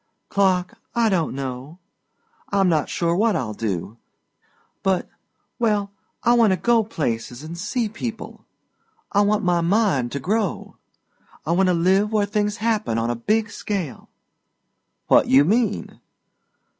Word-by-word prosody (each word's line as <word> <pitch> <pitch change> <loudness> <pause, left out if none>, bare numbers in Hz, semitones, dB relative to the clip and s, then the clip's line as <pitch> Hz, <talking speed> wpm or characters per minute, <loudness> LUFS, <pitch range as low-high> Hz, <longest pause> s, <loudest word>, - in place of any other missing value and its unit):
"Clark, 190 +2 +1 0.2
I 230 -1 +3
don't 170 -8 0
know. 135 +3 -6 0.7
I'm 195 -2 +3
not 160 -4 +1
sure 170 0 0
what 215 +3 +2
I'll 110 -4 -2
do, 105 0 -4 0.8
but 190 -2 0 0.5
well, 210 -4 +1 0.3
I 240 - +4
want 230 -5 +4
to - - 0
go 230 +5 +3
places 125 - -3
and 160 +2 -7
see 215 +6 -2
people. 225 +1 -7 0.7
I 205 - +3
want 210 +1 +2
my 175 -2 +2
mind 170 - +1
to 140 - -2
grow. 205 - -2 0.7
I 160 - -1
want 185 +2 +3
to 180 - +3
live 190 +5 +2
where 210 -2 +2
things 210 0 -1
happen 215 - 0
on 115 +1 0
a - - -2
big 215 - 0
scale." 180 - -5 1.0
"What - - +4
you 135 +2 +6
mean?" 215 +2 0
190 Hz, 145 wpm, -22 LUFS, 155-215 Hz, 1.0 s, you